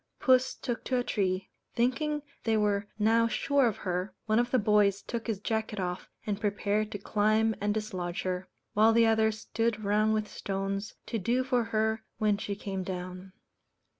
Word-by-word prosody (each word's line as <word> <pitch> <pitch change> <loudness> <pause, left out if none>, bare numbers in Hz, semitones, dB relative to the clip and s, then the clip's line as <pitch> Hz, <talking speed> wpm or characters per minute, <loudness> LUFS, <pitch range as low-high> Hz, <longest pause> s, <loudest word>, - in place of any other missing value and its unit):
Puss 255 -1 +4
took 240 -3 -4
to 255 - +1
a 245 - +1
tree. 190 -4 -1 0.2
Thinking 295 +5 +1 0.2
they 225 -1 +2
were 205 -1 +1
now 225 +2 +4
sure 280 +2 +2
of 220 - -1
her, 185 +1 -3
one 215 +1 +3
of 240 0 +1
the 255 - +3
boys 205 -3 +3
took 235 -1 -4
his 220 -4 -1
jacket 220 -1 -2
off, 180 -1 -3 0.2
and 210 0 -2
prepared 210 0 0
to - - -2
climb 215 +2 +2
and 205 0 +1
dislodge 185 -5 -3
her; 185 0 -2 0.3
while 220 +2 +5
the 230 0 +5
others 220 -1 +2
stood 225 -1 -1
round 215 +2 +2
with 215 -1 -1
stones, 195 +1 -3
to 230 - -2
do 240 +7 +1
for 250 -3 +1
her 220 0 0
when 210 -2 +2
she 200 -1 -3
came 195 -1 -4
down. 185 0 -6
215 Hz, 180 wpm, -29 LUFS, 200-230 Hz, 0.3 s, while